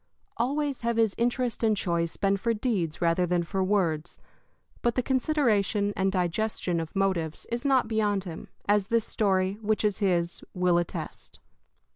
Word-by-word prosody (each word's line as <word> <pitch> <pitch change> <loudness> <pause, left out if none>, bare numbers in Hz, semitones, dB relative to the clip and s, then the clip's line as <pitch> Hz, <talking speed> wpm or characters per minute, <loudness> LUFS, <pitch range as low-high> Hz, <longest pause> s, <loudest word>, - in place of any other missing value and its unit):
Always 280 +3 -1
have 235 0 0
his 225 -3 +3
interest 240 0 0
and 215 -2 +3
choice 170 -2 -1
been 195 0 +2
for 230 +3 0
deeds 195 -9 -1
rather 170 +1 +2
than 175 0 +1
for 190 +2 -1
words; 175 -5 0 0.6
but 240 -1 +1
the 255 - +1
consideration 230 -7 +1
and 190 0 +1
digestion 180 -1 -1
of 165 +2 -6
motives 185 -5 0
is 235 +3 -2
not 265 -4 +3
beyond 210 -3 +1
him, 170 -4 -8 0.2
as 205 -1 +3
this 230 0 +1
story, 195 -2 0
which 215 0 0
is 205 -2 +1
his, 175 -4 0
will 180 -1 +3
attest. 175 - -6
200 Hz, 160 wpm, -27 LUFS, 180-230 Hz, 0.6 s, his